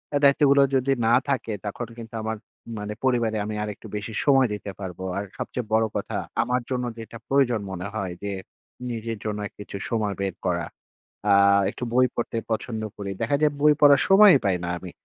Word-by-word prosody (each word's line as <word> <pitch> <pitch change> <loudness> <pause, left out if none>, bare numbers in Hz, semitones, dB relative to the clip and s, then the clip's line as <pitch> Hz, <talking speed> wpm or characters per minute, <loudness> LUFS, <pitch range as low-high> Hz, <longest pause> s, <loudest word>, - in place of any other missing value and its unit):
এ - - +5
দায়িত্বগুলো 140 0 +5
যদি 135 +1 +2 0.2
না 115 - +4 0.2
থাকে, 130 -5 -1
তখন 105 +3 -4
কিন্তু 115 -1 -10
আমার 110 0 -3 0.4
মানে 105 0 -4
পরিবারে 120 -4 +1
আমি 105 0 -4
আরেকটু 105 +1 -7
বেশি 105 +2 -5
সময় 135 -2 +5
দিতে 105 -1 -5
পারবো। 95 -2 -6
আর 100 - -1
সবচেয়ে 125 - -4
বড় 110 0 +4
কথা - - -3 0.3
আমার 125 +1 0
জন্য 125 -1 -1 0.2
যেটা 115 +1 -8
প্রয়োজন 130 -5 +2
মনে 95 +1 -4
হয় 100 -5 -3
যে, 100 - -2 0.6
নিজের 115 -1 -4
জন্য 105 -1 -2 0.2
কিছু 105 -1 -7
সময় 110 -3 -1
বের 95 -3 -2
করা। 85 -2 0 0.7
আ - - +7 0.4
একটু - - -7
বই 130 +1 +5
পড়তে 115 -1 -2
পছন্দ 110 0 -2 0.2
করি। 100 -1 -4
দেখা 145 - +1
যায় 150 -1 +3
বই 150 0 +6
পড়ার 145 -1 +7
সময়ই 195 -6 +8
পাই 95 -2 +2
না 90 - -2
আমি। 90 0 -9
115 Hz, 185 wpm, -25 LUFS, 105-130 Hz, 0.7 s, সময়ই